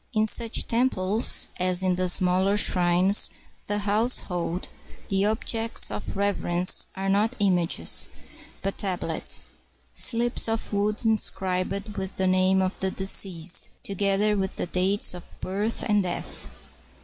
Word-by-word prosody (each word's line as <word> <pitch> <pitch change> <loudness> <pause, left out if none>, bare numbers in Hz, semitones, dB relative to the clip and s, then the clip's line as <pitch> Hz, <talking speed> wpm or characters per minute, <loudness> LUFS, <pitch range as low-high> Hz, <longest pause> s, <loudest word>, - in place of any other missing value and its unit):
In 215 -1 +2
such 230 +1 +2
temples, 225 -3 +1
as 185 0 +2
in 185 -1 +2
the 185 0 0
smaller 185 +3 +2
shrines 180 +1 +4 0.3
of - - -32
the 205 - -1
house 210 +4 +1
hold, 175 0 -4 0.4
the 195 0 +2
objects 225 +1 0
of 205 - -6
reverence 185 -3 +1
are 195 0 -4
not 210 +5 +1
images, 180 -5 +2 0.6
but 195 0 -3
tab 190 -3 -1
lets, - - 0 0.2
— - - -35
slips 240 0 +1
of 225 -1 -3
wood 210 +3 0
inscribed 195 -2 -1
with 190 0 -4
the 190 - 0
name 185 +1 +3
of 185 - -1
the 190 - +1
deceased, 185 -3 +1
together 200 +2 +1
with 190 -1 -2
the - - -2
dates 185 +3 +1
of 180 -1 -13
birth 205 +4 -1
and 210 -2 +2
death. 180 -2 -3
195 Hz, 145 wpm, -25 LUFS, 185-210 Hz, 0.6 s, shrines